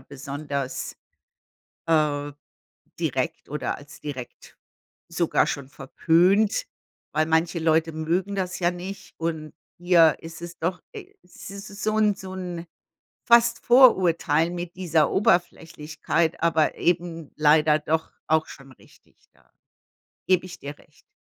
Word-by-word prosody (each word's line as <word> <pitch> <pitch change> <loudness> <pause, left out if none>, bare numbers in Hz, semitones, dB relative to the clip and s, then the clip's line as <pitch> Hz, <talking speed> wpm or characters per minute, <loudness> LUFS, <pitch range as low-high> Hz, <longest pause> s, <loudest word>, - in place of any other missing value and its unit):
besonders, 140 0 -5 0.9
äh, 150 -3 +1 0.7
direkt - - -2
oder - - -3
als - - -14
direkt 130 -5 -9 0.5
sogar 170 0 +1
schon 140 -3 -4
verpönt, 175 - +2 0.5
weil 155 +1 +2
manche 165 +1 +1
Leute 160 0 +2
mögen 170 +5 -1
das 185 -2 -3
ja 175 -1 +2
nicht. 185 +3 -8
Und 160 -2 -4 0.3
hier 175 -3 +5
ist 165 0 -10
es 170 +1 -8
doch 180 +2 -2
äh, - - -10
es 180 - -12
ist 200 0 -9
so 215 0 0
'n 210 -2 +3
so 190 -1 -9
'n 180 -2 -6 0.6
fast 235 -1 +4
Vorurteil 175 - +4
mit 175 0 -6
dieser 165 -4 +1
Oberflächlichkeit, 165 -3 0
aber 160 -2 +2
eben 170 -3 -1
leider 150 0 +4
doch 160 +1 -2
auch 160 0 +2
schon 135 -1 -13
richtig. - - -23 0.2
Da - - -29 0.8
gebe 185 -1 +3
ich 180 -1 -10
dir 145 +1 -8
recht. - - -25
165 Hz, 125 wpm, -24 LUFS, 155-180 Hz, 0.9 s, hier